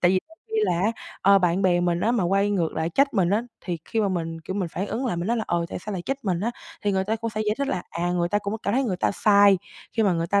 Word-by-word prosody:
Tại 175 - +5
vì 185 - +3
giống 325 - -19 0.2
như 435 - +3
là 170 - +1
á, 210 +4 +2 0.3
ờ, 200 +1 +6
bạn 180 +1 +1
bè 175 -2 +3
mình 175 -1 +1
á 230 +6 +2
mà 215 -7 +1
quay 195 +3 +2
ngược 175 -6 0
lại 160 +1 -1
trách 275 +7 +2
mình 185 -4 +2
á, 210 +3 +2 0.2
thì 175 -3 -4
khi 225 - -1
mà 205 - +2
mình, 165 -3 -3
kiểu, 180 +4 -6
mình 185 -4 -1
phản 190 +4 -3
ứng 250 +5 -2
lại 200 - -1
mình 170 +1 -2
nói 235 - +2
là, 220 - -1
ờ, 170 -1 0
tại - - -5
sao 210 +4 -6
lại 185 -3 -4
trách 270 +1 -4
mình 180 -3 0
á, 230 - 0 0.3
thì 205 -2 +1
người 190 0 +1
ta 220 +3 0
cũng 230 +1 -4
sẽ 215 0 -3
giải 210 - +2
thích 280 0 -1
là, 180 - -1
à, 175 +1 -1
người 175 -1 +1
ta 205 - +1
cũng 200 0 -4
cảm - - 0
thấy 270 +1 +2
người 190 -6 -1
ta - - +1
sai, 200 -2 +5 0.3
khi 225 - +1
mà 195 -3 +3
người 165 0 -1
ta 200 +3 +2
195 Hz, 335 wpm, -25 LUFS, 175-215 Hz, 0.3 s, ờ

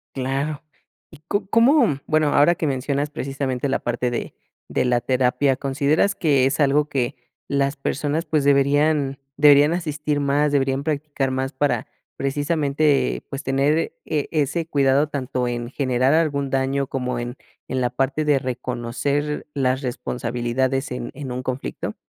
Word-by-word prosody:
Claro, 135 +3 -2 0.5
y 155 - -15
¿co 200 -1 0
cómo? 230 - +4
Bueno, 155 -1 +2
ahora 160 +5 +5
que 160 - -2
mencionas, 140 +2 -1
precisamente, 135 -1 -3
la - - 0
parte 120 0 -2
de 120 - -4 0.3
de - - 0
la 120 -1 +2
terapia, 130 +2 +2
¿consideras 145 +9 +1
que 140 -5 +3
es 135 +3 0
algo 145 +1 +3
que 130 -4 -1 0.3
las 140 0 +1
personas, 150 +4 -2
pues, 155 -2 +1
deberían 140 0 +2 0.2
deberían 145 +2 +6
asistir 150 -3 -2
más, 145 +1 +2
deberían 135 -1 +1
practicar 145 -3 -2
más 130 0 -2
para, 145 +2 0 0.3
precisamente, 140 - +1
pues, 135 - -5
tener 140 +4 +1
e 150 -3 -1
ese 160 +2 0
cuidado 140 0 +3
tanto 130 -3 -2
en 120 0 -3
generar 130 -1 +1
algún 145 -4 +1
daño 135 +1 0
como 125 -3 -3
en 120 +2 -5 0.3
en 130 - -1
la 125 - +1
parte 135 +4 -1
de 145 -2 +4
reconocer 130 +4 -2
las 130 -1 0
responsabilidades 125 +1 -2
en 125 -1 -5
en 135 -2 -6
un 125 - -3
conflicto? 130 0 -4
140 Hz, 150 wpm, -22 LUFS, 130-150 Hz, 0.5 s, deberían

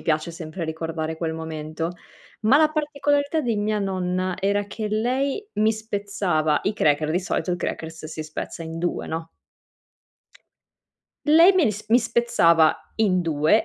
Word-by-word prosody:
piace 155 +1 0
sempre 165 +1 -6
ricordare 160 0 -4
quel 160 -1 -2
momento. 160 +1 -4 0.5
Ma 225 +6 +5
la 310 0 +4
particolarità 290 0 0
di 235 -4 0
mia 210 +1 0
nonna 185 -2 -1
era 200 +1 +1
che 210 +1 -5
lei 260 - -1
mi 215 +1 +4
spezzava, 200 -8 -1
i 210 - +1
cracker 150 -5 +2
di 175 +3 +1
solito 185 0 -2
il 175 - -1
crackers 160 -1 -5
si 155 0 -6
spezza 155 +2 -6
in 165 0 -6
2 175 +1 -2
no? 160 +1 -4 2.0
Lei 330 +5 +7
me 370 - +4
li 220 - +3
s 210 +1 -7
mi 240 +3 +5
spezzava 225 -9 +4 0.2
in 195 -5 +2
2 160 +5 +2
185 Hz, 155 wpm, -24 LUFS, 160-225 Hz, 2.0 s, Lei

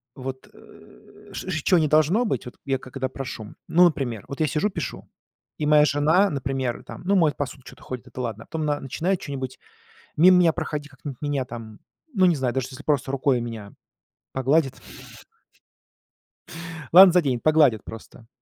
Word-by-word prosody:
вот, 130 0 -7
э, - - -18
с - - -7
ч 175 -5 -3
чё 185 - +4
не 155 -2 +2
должно 155 - +3
быть, 135 - -2
вот 125 - -9
я 135 -1 0
когда 130 0 -5
прошу 125 -5 -7
Ну 175 +2 +5
например, 125 - -1
вот 140 - -7
я 155 - +3
сижу, 155 +9 0
пишу, 165 - -6 0.5
и 150 - -2
моя 150 0 +6
жена, 155 +7 +3
например, 135 -4 -3
там, - - -10
ну, 200 - +2
моет 160 -7 +3
посуду, 140 -2 -5
чё-то - - -14
ходит, 125 -4 -7
это 125 - -7
ладно, 115 -2 -4
а - - -24
потом 160 0 -4
она 145 -1 0
начинает 170 +8 -1
чё-нибудь 130 -3 -6 0.6
мимо 180 +4 +7
меня 170 -2 +4
проходить, 150 -1 -4
как-нибудь 140 -1 -9
меня 145 -3 -1
там, 115 -3 -9 0.3
ну, 190 -4 +4
не 175 -2 +4
знаю, 130 -4 -1
даже 130 -1 -2
если 130 +2 -10
просто 140 -3 0
рукой 135 -2 +1
меня 115 -4 -7 0.6
погладит 135 +2 +2 2.2
ладно, 185 +1 +10
заденет, 140 -9 +1
погладит 150 -9 +4
просто. 115 +1 -11
140 Hz, 175 wpm, -24 LUFS, 130-160 Hz, 2.2 s, ладно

